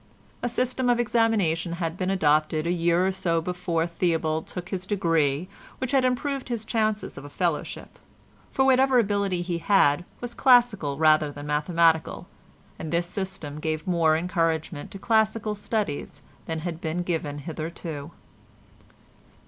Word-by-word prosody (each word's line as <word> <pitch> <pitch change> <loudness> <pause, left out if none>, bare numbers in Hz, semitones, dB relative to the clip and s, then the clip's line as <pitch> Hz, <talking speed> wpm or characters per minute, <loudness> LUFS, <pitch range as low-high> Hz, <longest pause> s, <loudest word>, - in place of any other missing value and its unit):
A 245 - -1
system 250 +1 0
of 240 -1 +3
examination 215 -8 +1
had 170 -1 -3
been 185 0 -2
adopted 155 -3 +2
a 170 - +1
year 170 +1 +2
or 190 - +2
so 180 -3 0
before 170 -1 -1
Theobald 165 -2 -1
took 180 0 -7
his 185 -1 -4
degree 165 -5 +1 0.3
which 260 -1 -3
had 270 -2 +3
improved 260 +2 -1
his 230 -3 -3
chances 215 -2 -1
of - - -12
a 145 - -9
fellowship, 170 -1 -3 0.5
for 265 - +2
whatever 265 0 +4
ability 200 -5 +1
he 175 -1 -2
had 165 -4 +3 0.2
was 245 -1 -5
classical 235 - +4
rather 155 -1 +4
than 145 0 -9
mathematical, 160 +2 +1 0.5
and 160 - -5
this 170 +1 +1
system 180 -5 -5
gave 155 0 -2
more 165 -3 +3
encouragement 165 -3 -1
to - - -8
classical 220 0 +1
studies 205 -7 -3 0.2
than 160 -1 -3
had 170 0 -5
been 165 +2 -2
given 160 -5 -2
hitherto. 155 -1 -6
175 Hz, 150 wpm, -26 LUFS, 160-210 Hz, 0.5 s, whatever